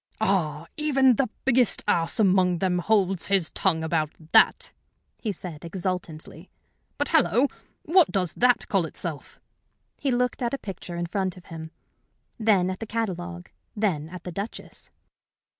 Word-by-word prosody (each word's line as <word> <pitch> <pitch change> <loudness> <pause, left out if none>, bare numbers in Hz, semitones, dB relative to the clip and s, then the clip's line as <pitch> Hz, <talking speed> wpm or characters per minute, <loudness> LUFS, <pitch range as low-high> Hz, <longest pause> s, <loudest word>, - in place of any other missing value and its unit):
"Ah, 165 -8 0
even 270 -5 +3
the 270 - +1 0.2
biggest 255 -3 +3
ass 165 +7 +1
among 185 -3 +4
them 180 0 0
holds 195 -2 +1
his 195 -5 +2
tongue 165 -4 +1
about 160 -2 0 0.2
that!" - - +4 0.5
he 220 - -2
said, 170 -5 -8
exultantly. 175 -2 -5 0.5
"But, 290 - -1
hallo! 285 -5 +4 0.4
What 345 0 +4
does 180 -4 0
that 245 0 +3
call 195 -4 +1
itself?" 160 -1 -6 0.6
He 280 - -1
looked 250 +1 0
at 240 +2 0
a - - -5
picture 185 -6 -8
in 170 0 -2
front 185 0 -2
of 180 - -14
him, 160 0 -7 0.7
then 200 -5 +3
at 185 - -6
the 225 - -6
catalogue, 180 -5 -4 0.2
then 180 -8 -1
at 180 0 -9
the 180 - -6
Duchess. 200 +6 -7
190 Hz, 150 wpm, -25 LUFS, 175-225 Hz, 0.7 s, among